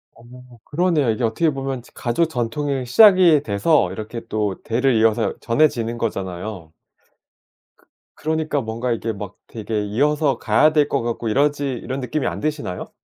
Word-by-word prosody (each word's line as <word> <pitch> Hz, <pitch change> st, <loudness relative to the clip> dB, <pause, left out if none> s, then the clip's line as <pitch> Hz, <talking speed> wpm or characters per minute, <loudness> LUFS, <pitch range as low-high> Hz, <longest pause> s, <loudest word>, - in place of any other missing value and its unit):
어. 115 Hz, -, -18 dB, 0.4 s
그러네요. 160 Hz, -4 st, +1 dB
이게 110 Hz, +3 st, -3 dB
어떻게 115 Hz, +9 st, +1 dB
보면 135 Hz, -2 st, -4 dB
가족 120 Hz, +8 st, 0 dB
전통이 135 Hz, 0 st, -2 dB
시작이 180 Hz, -, +6 dB
돼서 110 Hz, +9 st, +2 dB
이렇게 110 Hz, +2 st, -6 dB
또 105 Hz, -3 st, -2 dB
대를 125 Hz, +2 st, +1 dB
이어서 110 Hz, -1 st, +2 dB
전해지는 115 Hz, -2 st, +1 dB
거잖아요. 95 Hz, -5 st, -5 dB, 1.0 s
그 -, -, -31 dB, 0.3 s
그러니까 155 Hz, -2 st, -1 dB
뭔가 115 Hz, +2 st, -3 dB
이게 115 Hz, -1 st, -2 dB
막 100 Hz, -1 st, -8 dB
되게 110 Hz, -1 st, -3 dB
이어서 145 Hz, +5 st, +1 dB
가야 150 Hz, +10 st, +3 dB
될 150 Hz, -2 st, +3 dB
것 -, -, 0 dB
같고 115 Hz, 0 st, -3 dB
이러지 145 Hz, +4 st, +1 dB
이런 130 Hz, +2 st, -5 dB
느낌이 135 Hz, +2 st, -2 dB
안 -, -, -3 dB
드시나요? 145 Hz, -, -4 dB
125 Hz, 335 characters per minute, -21 LUFS, 110-150 Hz, 1.0 s, 시작이